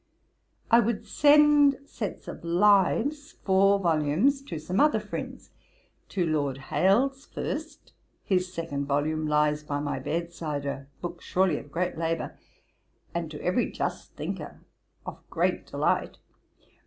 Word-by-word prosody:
'I 230 - +8
would 230 -1 0
send 295 -1 +5
sets 225 -7 -6
of - - -8
Lives, 210 - +2
four 195 +1 +4
volumes, 170 - +2
to 180 -12 -6
some 180 +6 -2
other 300 0 +4
friends, - - -7 0.6
to 180 -3 0
Lord 145 -4 0
Hailes 235 - +1
first. 315 +2 -6 0.3
His 185 -1 0
second 155 -5 -4
volume 155 +2 0
lies 150 0 +2
by 145 -1 -3
my 145 -2 -2
bed 170 +5 -3
side; 150 -4 -4
a 140 -1 -4
book 175 -1 -6
surely 185 -4 +1
of 145 - -14
great 175 0 -2
labour, 165 0 -2 0.8
and 170 -2 -3
to 150 -1 -8
every 185 +7 +1
just - - -4
thinker - - -6 0.4
of - - -7
great - - 0
delight. - - 0
175 Hz, 135 wpm, -27 LUFS, 150-220 Hz, 0.8 s, I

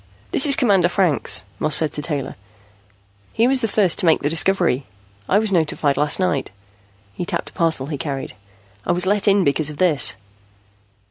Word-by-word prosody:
"This - - +3
is 280 - +5
Commander 195 -8 +2
Franks," 165 - +2 0.2
Moss 155 -1 +1
said 155 -2 +1
to 150 - -5
Taylor. 145 -3 -5 1.0
"He 230 - +2
was 265 0 +3
the 225 - 0
first 195 -5 +1
to 180 - +2
make 160 - +2
the 145 - -1
discovery. 165 -6 +1 0.4
I 195 - +3
was 215 -1 +3
notified 150 -4 0
last 150 +4 +1
night." 180 -7 -1 0.6
He - - -6
tapped - - -5
a - - -32
parcel 160 -5 0
he 145 0 -6
carried. 140 -4 -5 0.5
"I 175 - -1
was 180 +1 +2
let 205 +2 0
in 200 -1 +3
because 150 0 0
of 150 - -9
this." 165 -5 +1
165 Hz, 185 wpm, -19 LUFS, 145-195 Hz, 1.0 s, is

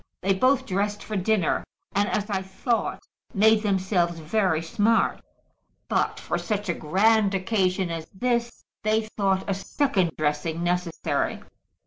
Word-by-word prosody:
"They 195 +1 +2
both 255 +7 +2
dressed 205 +2 -1
for 215 - -5
dinner, 195 -2 +1 0.3
and, 205 +1 +1
as 205 -1 -1
I 195 -3 -1
thought, 190 +5 -2 0.3
made 220 +2 +5
themselves 190 -4 +1
very 165 0 0
smart; 215 +7 +1 0.7
but - - 0
for - - -2
such 210 -3 -2
a - - +2
grand 200 +6 +2
occasion 185 -2 0
as 165 -1 -5
this 235 +3 -2 0.2
they 215 0 +2
thought 195 -2 +1
a 200 - +1
second 195 - 0
dressing 155 +2 -1
necessary. 175 -1 -1
195 Hz, 135 wpm, -25 LUFS, 180-215 Hz, 0.7 s, made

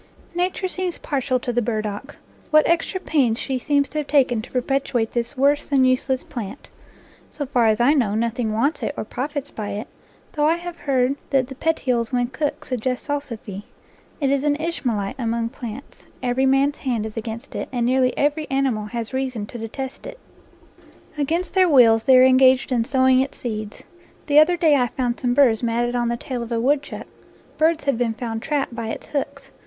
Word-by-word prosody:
Nature 360 +2 -1
seems 365 -1 -3
partial 265 -2 -1
to 245 0 -3
the 245 - +2
burdock. 215 +3 -3 0.3
What 305 0 +5
extra 340 +2 +1
pains 265 -10 +1
she 260 +1 -2
seems 285 +1 +1
to 305 - -3
have 295 - -4
taken 255 -6 +3
to 220 - -11
perpetuate 250 -3 -1
this 235 -1 -1
7 - - -11
NATURE - - -4
LORE 280 - +7
worse 290 - -4
than 270 -3 +3
useless 255 0 +1
plant! 230 +1 -7 0.6
So 290 - -5
far 245 -3 +2
as 215 -1 +2
I 250 +5 +5
know, 230 -9 +1
nothing 230 0 -1
wants 270 +9 0
it 290 - -3
or - - -2
profits 285 +4 -4
by 210 -2 -5
it, 210 +3 -5 0.4
though 295 0 +1
I 325 - +3
have 345 0 -7
heard 265 -1 +1
that 265 -2 +1
the - - -6
petioles 255 -5 0
when 245 -1 0
cooked 290 +2 -3
suggest 255 0 -2
salsify. 235 -9 -5 0.6
It 275 -3 +1
is 280 0 +1
an 295 -1 +2
Ishmaelite 260 -11 -2
among 230 -1 -1
plants. 235 +3 -9 0.2
Every 255 +2 +1
man's 275 +2 +2
hand 240 -5 -2
is 220 - -7
against 225 0 -6
it, - - -4
and 245 -2 0
nearly 255 +1 +2
every 295 +2 0
animal 265 -6 0
has 230 +2 -5
reason 260 -5 -2
to 235 - -9
detest 260 - -6
it. - - -9 1.0
Against 320 +5 -1
their 375 -2 +4
wills 230 -6 +6
they 260 +3 +6
are 255 - +8
engaged 260 0 +5
in 235 -3 +1
sowing 260 0 +3
its 265 +1 -2
seeds. 215 -3 -5 0.4
The 290 +1 +5
other 350 +3 +5
day 315 -4 +4
I 250 -3 +2
found 245 0 -2
some 245 -1 0
burrs 245 -6 +4
matted 240 +1 0
on 240 -1 +1
the 235 - -1
tail 250 0 -5
of 235 0 -6
a 230 - 0
woodchuck. 275 +4 -1 0.5
Birds 320 +1 +2
have 275 -4 0
been 230 -2 0
found 225 -1 -4
trapped 285 -3 -1
by 230 -1 -4
its 225 - -5
hooks. 275 -1 -4
255 Hz, 200 wpm, -22 LUFS, 235-285 Hz, 1.0 s, are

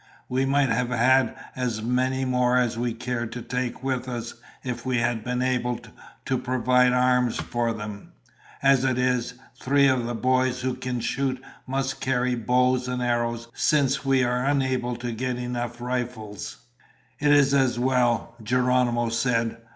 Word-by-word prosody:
We 130 +1 0
might 140 -1 +2
have 120 +1 0
had 125 0 +3 0.2
as 120 -4 -2
many 130 +2 0
more 125 -1 +2
as 120 -2 +1
we 120 +1 -1
cared 120 0 -4
to 120 - -6
take 125 0 -3
with 130 -1 -2
us 120 -1 -5 0.3
if 120 -2 -4
we 130 -1 0
had 120 -2 0
been 125 +1 -1
able 125 -1 0 0.5
to 130 - 0
provide 125 0 +3
arms 125 -1 +2
for 120 -1 -1
them. 105 -2 -7 0.5
As 135 -1 +5
it 130 -2 +1
is, 125 -1 0 0.3
three 140 +1 +3
of 130 -3 +1
the 120 - -3
boys 130 +1 +1
who 130 0 -1
can 125 -1 -4
shoot 130 +1 -1 0.3
must 135 0 -2
carry 125 -1 +1
bows 125 +2 +1
and 125 0 -2
arrows 120 -1 -1
since 140 -2 +2
we 135 -2 +3
were 125 +1 0
unable 130 -3 0
to 120 0 -4
get 125 +2 -2
enough 120 -1 -4
rifles." 120 -4 -4 0.6
"It 145 0 +3
is 140 -1 +5
as 130 -4 +3
well," 120 -2 +1
Geronimo 125 0 +1
said. 115 -1 0
125 Hz, 160 wpm, -25 LUFS, 120-130 Hz, 0.6 s, As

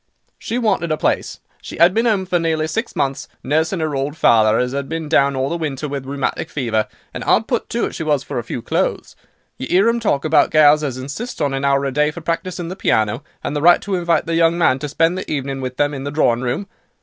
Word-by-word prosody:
She 230 - -3
wanted 200 -8 0
a 155 - +1
place. - - -1 0.2
She - - -9
'ad 170 +2 +6
been 230 +3 +1
'ome 200 -4 +1
for 180 -1 0
nearly 160 -2 0
six 225 +9 -3
months, 135 -1 -2 0.2
nursing 160 +4 0
'er 155 -2 -2
old 140 +3 -3
father, 110 -4 +4
as 125 +1 -1
'ad 140 0 -3
been 165 -1 -4
down 140 -2 +3
all 130 0 0
the 170 - -2
winter 150 -2 -3
with 140 -2 -5
rheumatic 140 +3 -3
fever; 115 -6 -1 0.3
and - - -5
'ard - - +3
put - - -2
to - - 0
it - - -5
she - - -6
was 150 -4 0
for - - -4
a - - -5
few 115 0 -6
clothes. - - -2 0.4
You 130 - -4
'ear 190 +5 +4
'em 235 0 +2
talk 155 -11 0
about 155 - +4
gals 155 0 +5
as 135 -4 -3
insists 145 - -6
on 145 -3 0
an 135 0 -2
hour 140 0 +2
a 135 - -1
day 150 +2 +2
for 170 +3 -8
practising 175 +2 -3
the 185 - -5
piano, 110 - +1 0.2
and 145 - -3
the 145 - -1
right 175 +3 +6
to 200 - -4
invite 170 -2 +1
their 165 - -2
young 165 0 +3
man 135 -6 +3
to 150 - -4
spend 165 +5 +1
the - - -7
evening 135 -2 -3
with 130 -1 -5
them 145 0 +1
in 135 -1 -5
the 140 - -3
drawing 125 -5 +1
room. 125 +10 -2
150 Hz, 255 wpm, -19 LUFS, 135-170 Hz, 0.4 s, ad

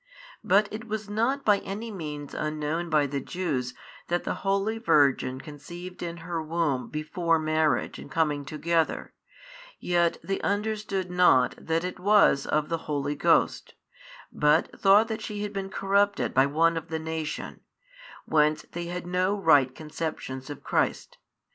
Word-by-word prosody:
But 200 +2 +4
it 225 +2 -6
was 215 -1 -4
not 245 +6 0
by 205 -2 +5
any 215 +4 -6
means 150 -6 -6
unknown 155 +2 -2
by 155 -2 +3
the 140 0 -2
Jews 135 -6 -3 0.3
that 175 0 0
the - - -2
holy 200 +3 0
Virgin 140 - +3
conceived 175 +6 -9
in 170 -1 -4
her 170 -2 -2
womb 155 -5 -1
before 165 +2 0
marriage 155 -1 0
and - - -10
coming 150 -3 0
together, 160 +3 -1 0.7
yet 175 -1 +1
they 195 0 -2
understood 205 -3 -2
not 175 -9 +4
that 165 +1 -1
it 180 0 -5
was 200 -7 +4
of 150 0 +1
the 165 0 -2
Holy 145 -1 -1
Ghost, 145 - +1 0.6
but 150 +2 +2
thought 205 +3 +6
that 220 -1 -4
she 210 -1 -4
had 205 0 -4
been 195 -1 -4
corrupted 200 +1 +1
by 135 +1 +4
one 165 +3 +2
of 165 - -5
the 160 - -3
nation, 160 -1 -5 0.7
whence 150 0 +2
they 175 0 -4
had 175 +1 -5
no 185 +3 0
right 140 -8 +4
conceptions 150 -4 -5
of 145 - -8
Christ. - - -1
165 Hz, 155 wpm, -27 LUFS, 150-195 Hz, 0.7 s, thought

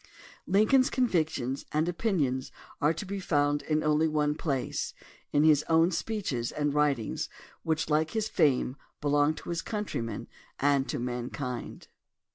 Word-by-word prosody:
Lincoln's 215 +8 +4
convic 185 -12 +2
tions 135 -1 -3
and 155 +2 +1
opinions 165 - 0 0.3
are 150 - +4
to 165 +5 -5
be 200 +1 -4
found 145 -4 +1
m 155 0 +1
only 155 +1 +3
one 150 -1 +1
place, 140 -4 -2 0.4
in 145 - +3
his 155 -1 +5
own 165 +2 +4
speeches 165 - -2
and 145 -1 -1
writings 145 -6 0 0.3
which, 160 -1 0
like 155 +1 +2
his 220 +2 -1
fame, 140 -8 +2 0.2
belong 145 +1 +2
to - - -9
his 170 -1 -1
countrymen 120 - -4 0.3
and 140 -1 +2
to - - -1
mankind. 125 +1 -4
150 Hz, 145 wpm, -29 LUFS, 140-170 Hz, 0.4 s, his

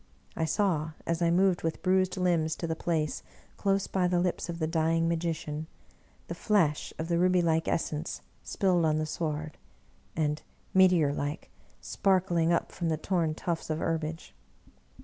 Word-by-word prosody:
I 160 - 0
saw, 160 -3 0
as 170 0 -1
I 170 - +3
moved 180 +1 +3
with 165 0 -3
bruised 185 0 +2
limbs 170 -3 +1
to - - -4
the 160 -1 -1
place, 160 -2 -1 0.3
close 195 -1 +1
by 185 -2 0
the 175 0 +2
lips 175 -1 -1
of 170 - -3
the 160 - -1
dying 165 +1 +1
magician, 160 -2 -2 0.6
the - - -4
flash 170 -9 +1
of 160 - -3
the 170 0 +1
rubylike 175 -3 +2
essence 155 -1 -2 0.2
spilled 180 -3 +1
on 155 -1 +2
the 155 - 0
sward, 155 -1 -4 0.6
and, 150 -1 0 0.3
meteor 180 -6 +5
like, 145 +1 -4 0.3
sparkling 180 -4 +1
up 170 - 0
from 170 -2 -2
the 160 - 0
torn 165 -2 0
tuftSs 170 0 -3
of 155 - 0
herbage. 160 0 -3
165 Hz, 160 wpm, -29 LUFS, 155-180 Hz, 0.6 s, meteor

